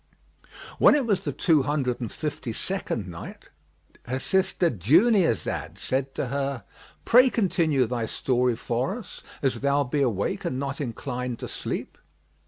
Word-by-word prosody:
When -, -, +7 dB
it 285 Hz, -4 st, +1 dB
was 205 Hz, -5 st, +1 dB
the 145 Hz, -, 0 dB
Two 150 Hz, +2 st, +3 dB
Hundred 130 Hz, -3 st, -1 dB
and 115 Hz, -, -4 dB
Fifty 145 Hz, -6 st, -4 dB
second 120 Hz, -, -2 dB
Night, 85 Hz, -2 st, -9 dB, 0.6 s
Her 130 Hz, +2 st, -1 dB
sister 180 Hz, +2 st, +1 dB
Dunyazad 165 Hz, -, +2 dB
said 135 Hz, +1 st, -2 dB
to 130 Hz, -, -2 dB
her, 140 Hz, -2 st, -2 dB, 0.4 s
"Pray 250 Hz, +2 st, +7 dB
continue 165 Hz, -, +2 dB
thy 120 Hz, -1 st, -2 dB
story 125 Hz, 0 st, +1 dB
for 125 Hz, -, -2 dB
us, 240 Hz, -, -11 dB, 0.2 s
as 135 Hz, -, +1 dB
thou 140 Hz, +1 st, +2 dB
be 140 Hz, +2 st, -1 dB
awake 110 Hz, -7 st, 0 dB
and 130 Hz, -, -2 dB
not 140 Hz, +1 st, -3 dB
inclined 125 Hz, -1 st, -4 dB
to -, -, -6 dB
sleep." -, -, -5 dB
135 Hz, 150 wpm, -26 LUFS, 125-165 Hz, 0.6 s, When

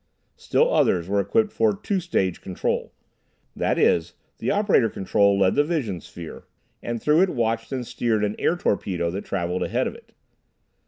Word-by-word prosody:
Still -, -, +1 dB
others 85 Hz, -2 st, +2 dB
were 100 Hz, +1 st, +1 dB
equipped 210 Hz, -, +1 dB
for 215 Hz, -2 st, +2 dB
two 200 Hz, -1 st, -1 dB
stage 95 Hz, -, -1 dB
control. 95 Hz, -, -2 dB, 0.6 s
That -, -, 0 dB
is, 85 Hz, +1 st, +2 dB, 0.2 s
the -, -, -2 dB
operator 200 Hz, -, +3 dB
control 100 Hz, 0 st, +2 dB
led 95 Hz, -1 st, +3 dB
the 145 Hz, -, +3 dB
vision 135 Hz, -, -2 dB
sphere, 85 Hz, -2 st, -10 dB, 0.4 s
and 120 Hz, 0 st, -3 dB
through 150 Hz, +7 st, +3 dB
it 190 Hz, -, +3 dB
watched 115 Hz, -3 st, -1 dB
and 130 Hz, -2 st, -3 dB
steered 115 Hz, -2 st, -1 dB
an 105 Hz, +1 st, -1 dB
air 170 Hz, -, +2 dB
torpedo 90 Hz, -, -1 dB
that 100 Hz, +3 st, -5 dB
travelled 90 Hz, -1 st, -2 dB
ahead -, -, 0 dB
of -, -, -3 dB
it. -, -, -17 dB
110 Hz, 170 wpm, -24 LUFS, 95-150 Hz, 0.6 s, operator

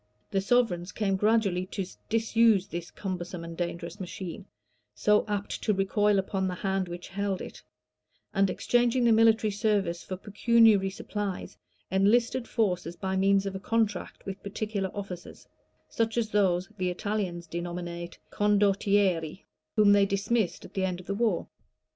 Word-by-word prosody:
The 195 Hz, -, +1 dB
sovereigns 195 Hz, -5 st, +1 dB
came 195 Hz, -2 st, 0 dB
gradually 195 Hz, -3 st, +2 dB
to 195 Hz, 0 st, -3 dB, 0.2 s
disuse 225 Hz, -3 st, +3 dB
this 175 Hz, -2 st, -6 dB
cumbersome 180 Hz, -3 st, -5 dB
and 165 Hz, 0 st, -7 dB
dangerous 170 Hz, +1 st, -4 dB
machine, 185 Hz, +1 st, -7 dB, 0.5 s
so 210 Hz, 0 st, +3 dB
apt 205 Hz, -1 st, -3 dB
to 210 Hz, -, +1 dB
recoil 205 Hz, +1 st, +2 dB
upon 190 Hz, 0 st, -1 dB
the 180 Hz, -, -3 dB
hand 190 Hz, 0 st, -1 dB
which 175 Hz, 0 st, -8 dB
held 195 Hz, -1 st, -2 dB
it; -, -, -9 dB, 0.7 s
and 195 Hz, -1 st, +3 dB
exchanging 240 Hz, +5 st, +2 dB
the 235 Hz, -, +5 dB
military 225 Hz, -1 st, +4 dB
service 200 Hz, -4 st, 0 dB
for 185 Hz, -, -5 dB
pecuniary 210 Hz, 0 st, +4 dB
supplies, 200 Hz, 0 st, -5 dB, 0.4 s
enlisted 230 Hz, +6 st, +2 dB
forces 180 Hz, -7 st, -1 dB
by 190 Hz, +1 st, -3 dB
means 195 Hz, +1 st, +3 dB
of 195 Hz, -, -3 dB
a 190 Hz, -, -4 dB
contract 215 Hz, -2 st, -1 dB
with 195 Hz, 0 st, -6 dB
particular 200 Hz, -1 st, -3 dB
officers, 190 Hz, -4 st, -8 dB, 0.4 s
(such 225 Hz, 0 st, -1 dB
as 220 Hz, -2 st, 0 dB
those 185 Hz, -3 st, +2 dB
the 185 Hz, -1 st, +1 dB
Italians 180 Hz, -2 st, -3 dB
denominate 170 Hz, +1 st, -5 dB
"condottieri,") 200 Hz, -4 st, +2 dB, 0.3 s
whom 210 Hz, -2 st, +6 dB
they 200 Hz, -1 st, +5 dB
dismissed 200 Hz, 0 st, 0 dB
at -, -, -13 dB
the 190 Hz, -, -1 dB
end 180 Hz, -1 st, -1 dB
of 180 Hz, -, -11 dB
the 200 Hz, -, -2 dB
war. 210 Hz, -3 st, 0 dB
195 Hz, 150 wpm, -28 LUFS, 180-210 Hz, 0.7 s, whom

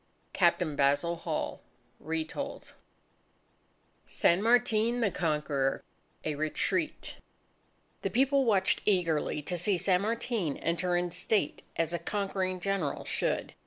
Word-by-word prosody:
Captain 170 Hz, -4 st, +2 dB
Basil 145 Hz, +5 st, +2 dB
Hall -, -, -3 dB, 0.4 s
(Retold) 160 Hz, 0 st, -4 dB, 1.3 s
SAN 175 Hz, +3 st, +3 dB
MARTIN 235 Hz, 0 st, +3 dB
THE 215 Hz, -5 st, +1 dB
CONQUEROR 150 Hz, -5 st, -1 dB, 0.4 s
A 155 Hz, -, 0 dB
Retreat 155 Hz, -, -2 dB, 0.8 s
The -, -, -1 dB
people 275 Hz, +2 st, +3 dB
watched 195 Hz, -6 st, +2 dB
eagerly 165 Hz, -6 st, +1 dB
to 175 Hz, +4 st, -3 dB
see 190 Hz, +2 st, +2 dB
San 180 Hz, +1 st, +2 dB
Martin 225 Hz, -, -1 dB
enter 175 Hz, +2 st, 0 dB
in 175 Hz, 0 st, -1 dB
state 180 Hz, -1 st, 0 dB
as 165 Hz, 0 st, 0 dB
a 170 Hz, -, -1 dB
conquering 190 Hz, 0 st, -2 dB
general 195 Hz, -6 st, -2 dB
should. -, -, -1 dB
180 Hz, 115 wpm, -30 LUFS, 160-210 Hz, 1.3 s, SAN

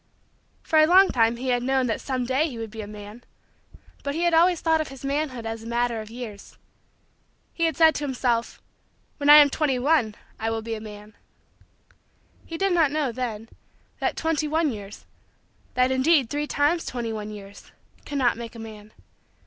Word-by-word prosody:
For 315 Hz, -, +3 dB
a 310 Hz, -, +6 dB
long 380 Hz, +3 st, +6 dB
time 230 Hz, -1 st, +2 dB
he 255 Hz, +2 st, -4 dB
had 245 Hz, -1 st, +1 dB
known 265 Hz, +1 st, +1 dB
that 225 Hz, -3 st, -2 dB
some 255 Hz, -2 st, -2 dB
day 265 Hz, +6 st, +1 dB
he 245 Hz, -, -8 dB
would 225 Hz, -1 st, -6 dB
be 220 Hz, 0 st, -7 dB
a 205 Hz, -, -7 dB
man. 210 Hz, +3 st, -10 dB, 0.8 s
But 280 Hz, 0 st, -3 dB
he 335 Hz, -, -1 dB
had 345 Hz, -1 st, +2 dB
always 345 Hz, +1 st, +4 dB
thought 320 Hz, -1 st, +2 dB
of 310 Hz, -, -4 dB
his 270 Hz, 0 st, -10 dB
manhood 275 Hz, -4 st, -2 dB
as 225 Hz, 0 st, -4 dB
a 225 Hz, -, -10 dB
matter 235 Hz, -1 st, -1 dB
of 215 Hz, -, -10 dB
years. 225 Hz, -4 st, -9 dB, 1.0 s
He 335 Hz, -, 0 dB
had 325 Hz, -, -1 dB
said 320 Hz, -1 st, +6 dB
to 290 Hz, -, -4 dB
himself: 245 Hz, -4 st, -1 dB, 0.6 s
"when 290 Hz, -1 st, 0 dB
I 295 Hz, -, +11 dB
am 295 Hz, -2 st, +8 dB
twenty 285 Hz, -4 st, 0 dB
one, 250 Hz, -5 st, +2 dB, 0.2 s
I 225 Hz, -, -1 dB
will 225 Hz, -1 st, -3 dB
be 230 Hz, 0 st, -4 dB
a 215 Hz, -, -5 dB
man." 210 Hz, 0 st, -11 dB, 1.3 s
He 330 Hz, -, -6 dB
did 390 Hz, +1 st, +1 dB
not 325 Hz, -4 st, +4 dB
know, 295 Hz, -3 st, -1 dB
then, 230 Hz, -2 st, -5 dB, 0.5 s
that -, -, -1 dB
twenty 320 Hz, -2 st, 0 dB
one 315 Hz, 0 st, +1 dB
years 205 Hz, -2 st, -9 dB, 0.7 s
that 255 Hz, +1 st, +3 dB
indeed 260 Hz, -1 st, +3 dB
three 295 Hz, +1 st, -2 dB
times 300 Hz, +4 st, +1 dB
twenty 235 Hz, -3 st, -4 dB
one 210 Hz, -1 st, -5 dB
years 200 Hz, -1 st, -11 dB, 0.3 s
cannot 265 Hz, -5 st, 0 dB
make 235 Hz, 0 st, -8 dB
a -, -, -9 dB
man. 215 Hz, -1 st, -10 dB
255 Hz, 195 wpm, -24 LUFS, 225-300 Hz, 1.3 s, I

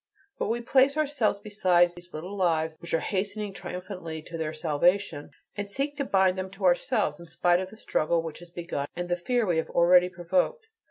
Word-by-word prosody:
But -, -, 0 dB
we 235 Hz, +2 st, -1 dB
place 265 Hz, +4 st, +3 dB
ourselves 285 Hz, -9 st, +1 dB
beside 185 Hz, -4 st, +3 dB
these 175 Hz, 0 st, -12 dB
lives 165 Hz, -2 st, -1 dB
which 170 Hz, -, -7 dB
are 165 Hz, -, 0 dB
hastening 205 Hz, +1 st, -2 dB
triumphantly 180 Hz, -4 st, -6 dB
to 165 Hz, -, -9 dB
their 160 Hz, -2 st, -2 dB
salvation, 160 Hz, +1 st, +1 dB, 0.3 s
and 205 Hz, -1 st, -4 dB
seek 275 Hz, +7 st, -2 dB
to 280 Hz, -, -1 dB
bind 190 Hz, -4 st, +3 dB
them 185 Hz, 0 st, -4 dB
to 195 Hz, -1 st, -4 dB
ourselves, 180 Hz, -, +2 dB
in 170 Hz, -, -11 dB
spite 175 Hz, +2 st, +2 dB
of 185 Hz, 0 st, -4 dB
the 220 Hz, -, -14 dB
struggle 165 Hz, -4 st, 0 dB
which 160 Hz, -2 st, -7 dB
has 175 Hz, 0 st, -12 dB
begun 170 Hz, -5 st, -4 dB
and 175 Hz, 0 st, -4 dB
the 175 Hz, -, +2 dB
fear 240 Hz, +6 st, 0 dB
we 175 Hz, -4 st, +1 dB
have 160 Hz, -, -1 dB
already 180 Hz, +1 st, +5 dB
provoked. 270 Hz, -, 0 dB
180 Hz, 200 wpm, -27 LUFS, 170-205 Hz, 0.3 s, already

